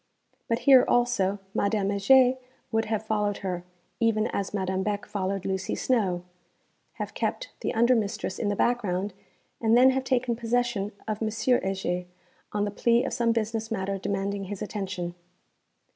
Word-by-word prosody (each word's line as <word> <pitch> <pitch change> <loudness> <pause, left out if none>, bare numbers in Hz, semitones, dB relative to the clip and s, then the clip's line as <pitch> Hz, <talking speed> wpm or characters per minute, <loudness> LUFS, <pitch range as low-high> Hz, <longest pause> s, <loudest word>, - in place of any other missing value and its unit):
But 230 - +1
here 265 -2 +8
also 220 -5 +2 0.2
Madame 200 -1 +1
Heger 250 +6 +5 0.4
would 225 -1 +1
have 220 0 -2
followed 210 -2 0
her 180 -2 -2 0.4
(even 225 -2 +2
as 200 - -2
Madame 190 -2 -1
Beck 205 +1 -2
followed 195 -1 -3
Lucy 190 -1 -1
Snowe) 195 -9 0 0.7
have - - -5
kept - - -2
the - - -2
under 235 +3 +5
mistress 200 -3 -2
in 210 - 0
the 205 - 0
background, 205 -5 0 0.5
and 225 0 +4
then 260 +1 +7
have 265 0 -1
taken 250 -2 +1
possession 235 -3 0 0.2
of 215 0 -3
M. 220 - +1
Heger, 195 -6 0 0.5
on 205 0 0
the 205 - -3
plea 235 +4 +3
of 270 - -3
some 235 -1 +2
business 225 0 -1
matter 195 -3 -2
demanding 200 0 -2
his 205 +1 -5
attention. 190 -4 -4
210 Hz, 160 wpm, -27 LUFS, 195-235 Hz, 0.7 s, here